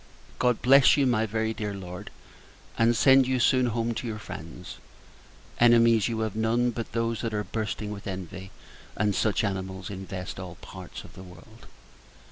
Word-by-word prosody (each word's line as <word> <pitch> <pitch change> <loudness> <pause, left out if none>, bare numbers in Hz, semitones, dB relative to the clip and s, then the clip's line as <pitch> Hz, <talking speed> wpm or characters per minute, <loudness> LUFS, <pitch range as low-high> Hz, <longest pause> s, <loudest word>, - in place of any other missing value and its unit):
God 125 -2 +1
bless 135 +3 +6
you, 140 - +3
my 110 -3 +2
very 110 +1 -1
dear 105 -2 -4
Lord, 90 -2 -8 0.7
and 115 +1 +3
send 135 0 +6
you 130 -1 +1
soon 130 +1 +3
home 115 0 -1
to 120 - -5
your 110 -2 -4
friends. 105 - -9 0.8
Enemies 115 -2 +5
you 115 -2 -2
have 110 -2 -2
none, 115 +2 +1
but 115 0 -6
those 115 -1 -1
that 115 -2 -3
are 105 - -1
bursting 105 -1 -4
with 100 -1 -7
envy; 95 0 -6 0.5
and 105 -1 +1
such 110 +2 +1
animals 95 -1 -4
infest 95 -2 -6
all - - -7
parts - - -10
of - - -14
the - - -11
world. 95 +5 -15
110 Hz, 170 wpm, -27 LUFS, 100-120 Hz, 0.8 s, bless